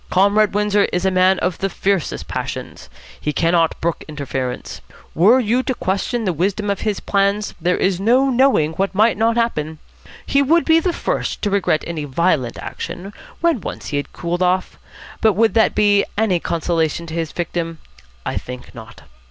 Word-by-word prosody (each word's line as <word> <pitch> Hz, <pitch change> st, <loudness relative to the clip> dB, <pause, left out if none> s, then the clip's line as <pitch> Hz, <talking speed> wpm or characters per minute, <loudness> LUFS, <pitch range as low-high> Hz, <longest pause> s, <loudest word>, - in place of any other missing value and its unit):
Comrade 200 Hz, +2 st, +3 dB
Windsor 210 Hz, 0 st, +2 dB
is 180 Hz, +1 st, -1 dB
a 190 Hz, -, +3 dB
man 185 Hz, 0 st, +4 dB
of 180 Hz, -2 st, -2 dB
the 195 Hz, -, -1 dB
fiercest 195 Hz, -3 st, -1 dB
passions. -, -, -6 dB, 0.3 s
He 150 Hz, -, -2 dB
cannot 165 Hz, +2 st, +1 dB
brook 170 Hz, 0 st, -2 dB
interference. 135 Hz, -4 st, -5 dB, 0.3 s
Were 215 Hz, +10 st, +5 dB
you 245 Hz, +1 st, +1 dB
to 260 Hz, 0 st, -2 dB
question 220 Hz, +5 st, -2 dB
the 185 Hz, -, +1 dB
wisdom 200 Hz, +5 st, -1 dB
of 200 Hz, -, -2 dB
his 210 Hz, -2 st, -1 dB
plans, 200 Hz, +1 st, 0 dB
there 180 Hz, +2 st, +1 dB
is 190 Hz, -2 st, +1 dB
no 255 Hz, +6 st, +3 dB
knowing 250 Hz, -, +3 dB
what 195 Hz, +3 st, -2 dB
might 220 Hz, +3 st, +4 dB
not 225 Hz, +2 st, +1 dB
happen. 160 Hz, -10 st, -1 dB, 0.5 s
He 280 Hz, -, +2 dB
would 325 Hz, +5 st, +3 dB
be 325 Hz, 0 st, +5 dB
the 355 Hz, +2 st, 0 dB
first -, -, -3 dB
to 205 Hz, -, 0 dB
regret 190 Hz, -6 st, +1 dB
any 160 Hz, -3 st, -4 dB
violent 145 Hz, -4 st, 0 dB
action, 195 Hz, +3 st, -7 dB, 0.3 s
when 335 Hz, -, +2 dB
once -, -, -6 dB
he 145 Hz, -, -1 dB
had 145 Hz, -1 st, -4 dB
cooled 175 Hz, +1 st, -3 dB
off, 185 Hz, +1 st, 0 dB, 0.4 s
but 220 Hz, -2 st, +4 dB
would 225 Hz, +3 st, +2 dB
that 225 Hz, -1 st, +3 dB
be 205 Hz, -1 st, +4 dB
any 205 Hz, -5 st, +2 dB
consolation 165 Hz, 0 st, -1 dB
to 160 Hz, -, -8 dB
his 165 Hz, -2 st, -2 dB
victim? 170 Hz, -1 st, -3 dB, 0.5 s
I -, -, -2 dB
think 125 Hz, 0 st, -10 dB
not. 110 Hz, -8 st, -12 dB
190 Hz, 180 wpm, -19 LUFS, 165-215 Hz, 0.5 s, Were